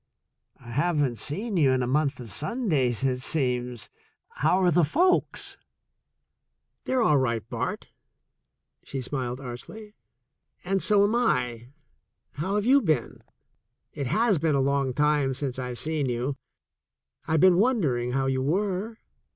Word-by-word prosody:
"I 120 Hz, -, -11 dB
haven't 145 Hz, -3 st, 0 dB
seen 190 Hz, -, -2 dB
you 140 Hz, -5 st, +4 dB
in 130 Hz, -1 st, +1 dB
a -, -, 0 dB
month 140 Hz, +1 st, 0 dB
of 115 Hz, -4 st, -8 dB
Sundays, 150 Hz, -, 0 dB
it 130 Hz, -2 st, +1 dB
seems. 125 Hz, -4 st, -1 dB, 0.4 s
How 160 Hz, +7 st, +1 dB
are 180 Hz, -, +4 dB
the 175 Hz, +1 st, +4 dB
folks?" 350 Hz, -, +1 dB, 1.3 s
"They're 255 Hz, -2 st, +1 dB
all 150 Hz, -9 st, +4 dB
right, 115 Hz, -5 st, -1 dB
Bart," -, -, -4 dB, 0.9 s
she 135 Hz, -, -5 dB
smiled 125 Hz, -1 st, -4 dB
archly, 140 Hz, -, -9 dB, 0.7 s
"and 195 Hz, +1 st, 0 dB
so 205 Hz, -2 st, +4 dB
am 205 Hz, +2 st, +2 dB
I. 125 Hz, -, 0 dB, 0.7 s
How 185 Hz, +7 st, -2 dB
have 210 Hz, 0 st, 0 dB
you 275 Hz, +3 st, +5 dB
been? 160 Hz, -, -1 dB, 0.7 s
It 140 Hz, -3 st, -4 dB
has 205 Hz, -, +2 dB
been 155 Hz, -1 st, +1 dB
a -, -, +2 dB
long 135 Hz, 0 st, +1 dB
time 145 Hz, -3 st, +2 dB
since 135 Hz, -1 st, -4 dB
I've 125 Hz, -1 st, -5 dB
seen 150 Hz, -2 st, -1 dB
you. 125 Hz, +3 st, -2 dB, 0.9 s
I've 160 Hz, -2 st, +2 dB
been 185 Hz, -2 st, +6 dB
wondering 155 Hz, -, +1 dB
how 135 Hz, 0 st, 0 dB
you 130 Hz, -1 st, 0 dB
were. 195 Hz, -, -1 dB
145 Hz, 145 wpm, -26 LUFS, 125-190 Hz, 1.3 s, been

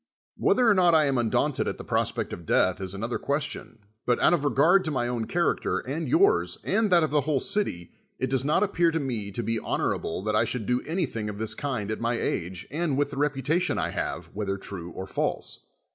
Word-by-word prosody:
Whether 250 Hz, -2 st, +3 dB
or 220 Hz, -, +7 dB
not 175 Hz, -3 st, +4 dB
T -, -, +8 dB
am 135 Hz, -3 st, +1 dB
un 115 Hz, -2 st, +1 dB
daunted -, -, +1 dB
at -, -, -2 dB
the -, -, -8 dB
prospect -, -, -1 dB
of 85 Hz, -, -7 dB
death, 95 Hz, +3 st, +2 dB
is 95 Hz, 0 st, -4 dB
another 115 Hz, +5 st, -3 dB
question, 140 Hz, -4 st, -3 dB, 0.3 s
but 120 Hz, -, +2 dB
out -, -, +4 dB
of 165 Hz, -5 st, +1 dB
regard 160 Hz, +7 st, +4 dB
to -, -, -1 dB
my 125 Hz, -5 st, 0 dB
own 120 Hz, -2 st, -2 dB
character, 170 Hz, +6 st, 0 dB
and 150 Hz, +6 st, -3 dB
yours, 395 Hz, +7 st, +3 dB
and 220 Hz, -1 st, +1 dB
that 175 Hz, -3 st, +5 dB
of 155 Hz, -, 0 dB
the 150 Hz, -1 st, +3 dB
whole 145 Hz, 0 st, 0 dB
city, 110 Hz, -, -2 dB, 0.3 s
it 130 Hz, -, -1 dB
does 135 Hz, -1 st, +2 dB
not 150 Hz, +7 st, +2 dB
appear 175 Hz, -4 st, +2 dB
to 165 Hz, 0 st, -1 dB
me 120 Hz, -8 st, -3 dB
to 110 Hz, +4 st, -4 dB
be 115 Hz, +1 st, -1 dB
honorable 90 Hz, -3 st, -2 dB
that 105 Hz, 0 st, 0 dB
I 105 Hz, -, +4 dB
should 115 Hz, -1 st, -2 dB
do 125 Hz, +2 st, +1 dB
onything 135 Hz, -, -2 dB
of 105 Hz, -, -6 dB
this 110 Hz, 0 st, 0 dB
kind 125 Hz, -8 st, -3 dB
at 110 Hz, -, -4 dB
my 115 Hz, +1 st, +1 dB
age, 90 Hz, +1 st, -3 dB
and 155 Hz, -2 st, -1 dB
with 145 Hz, 0 st, +1 dB
the 140 Hz, -, -7 dB
reputation 145 Hz, +5 st, 0 dB
I -, -, -1 dB
have, -, -, -4 dB
whetlier 100 Hz, -1 st, -2 dB
true 90 Hz, -3 st, -7 dB
or 95 Hz, +2 st, -6 dB
false. 95 Hz, -, -3 dB
135 Hz, 230 wpm, -26 LUFS, 110-165 Hz, 0.3 s, T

